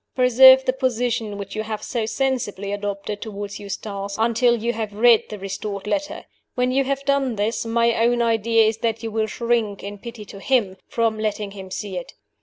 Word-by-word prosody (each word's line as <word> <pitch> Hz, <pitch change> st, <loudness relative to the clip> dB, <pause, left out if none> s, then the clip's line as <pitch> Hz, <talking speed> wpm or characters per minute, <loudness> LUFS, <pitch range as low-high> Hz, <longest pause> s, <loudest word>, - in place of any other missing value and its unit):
Preserve 260 Hz, +1 st, +7 dB
the 255 Hz, -, +2 dB
position 245 Hz, -5 st, -1 dB
which 200 Hz, -1 st, -7 dB
you 215 Hz, -, -1 dB
have 215 Hz, -1 st, -5 dB
so 230 Hz, -3 st, -2 dB
sensibly 225 Hz, -6 st, -2 dB
adopted 205 Hz, 0 st, -4 dB
toward 205 Hz, -2 st, -6 dB
Eustace 200 Hz, 0 st, -5 dB
until 235 Hz, +2 st, +3 dB
you 235 Hz, +2 st, -1 dB
have 215 Hz, -3 st, -4 dB
read 230 Hz, +1 st, +5 dB
the 210 Hz, -, -6 dB
restored 200 Hz, +1 st, -5 dB
letter. 295 Hz, +7 st, -3 dB, 0.3 s
When 250 Hz, 0 st, +1 dB
you 270 Hz, +1 st, +2 dB
have 275 Hz, +1 st, -2 dB
done 275 Hz, -3 st, +1 dB
this, 215 Hz, +3 st, -1 dB
my 235 Hz, 0 st, +2 dB
own 235 Hz, +1 st, +2 dB
idea 230 Hz, -1 st, +3 dB
is 220 Hz, 0 st, 0 dB
that 225 Hz, -1 st, -1 dB
you 225 Hz, -, -3 dB
will 220 Hz, 0 st, 0 dB
shrink, 230 Hz, -2 st, -1 dB
in 205 Hz, 0 st, -7 dB
pity 230 Hz, -1 st, -9 dB
to 200 Hz, -, -11 dB
him, 205 Hz, -5 st, +1 dB
from 225 Hz, -2 st, 0 dB
letting 210 Hz, -1 st, -2 dB
him 190 Hz, -2 st, -9 dB
see 190 Hz, 0 st, -5 dB
it. 175 Hz, -, -11 dB
225 Hz, 195 wpm, -22 LUFS, 205-240 Hz, 0.3 s, Preserve